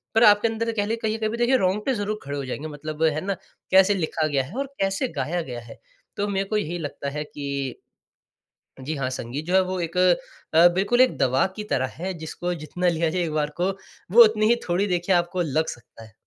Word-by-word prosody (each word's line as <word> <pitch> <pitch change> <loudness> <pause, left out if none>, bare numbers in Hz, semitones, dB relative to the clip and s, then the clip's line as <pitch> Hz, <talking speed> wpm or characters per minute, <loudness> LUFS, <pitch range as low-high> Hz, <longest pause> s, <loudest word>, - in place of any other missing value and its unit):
पर 225 - +5
आपके 210 +1 +6
अंदर 230 +1 -2
कह 205 -2 -1
लें 225 +2 -1
कहीं 220 0 0
कभी 220 +1 -1
देखिए 245 +2 +3
रोंगटे 210 +7 +1
ज़रूर 210 -1 -2
खड़े 140 0 -4
हो 140 - -4
जाएँगे, 145 +4 -5
मतलब 155 +1 -5
है 155 -1 +2
ना 195 - 0 0.4
कैसे 190 +2 +6
लिखा 160 -3 -1
गया 140 -3 +1
है 160 - -10
और 275 - -1
कैसे 195 +6 0
गाया 175 +2 -1
गया 125 -5 -6
है। 115 - -13 0.4
तो 205 0 0
मेरे 195 -1 -1
को 215 - +1
यही 175 -3 -2
लगता 145 -2 -4
है 150 +1 -4
कि 140 -3 -5 1.0
जी 150 +4 -4
हाँ 130 -2 -1
संगीत 130 +4 -5
जो 180 - -1
है 190 - +7
वो 185 0 -3
एक 170 +1 -4 0.6
अ, 170 +2 +8
बिल्कुल 205 +6 +2
एक 255 - +5
दवा 130 +5 +3
की 210 - -5
तरह 130 - +1 0.2
है, 190 - -1
जिसको 175 +2 -4
जितना 175 +3 -2
लिया 165 -1 +1
जाए 180 +1 -1
एक 160 -2 -2
बार 150 -1 0
को, 185 +2 +2 0.4
वो 235 +1 +10
उतनी 215 0 +2
ही 240 - +5
थोड़ी 180 +4 +1
देखिए 180 0 +1
आपको 175 +1 0
लग 160 +1 0
सकता 115 -1 -10
है। 110 - -16
175 Hz, 230 wpm, -24 LUFS, 150-205 Hz, 1.0 s, वो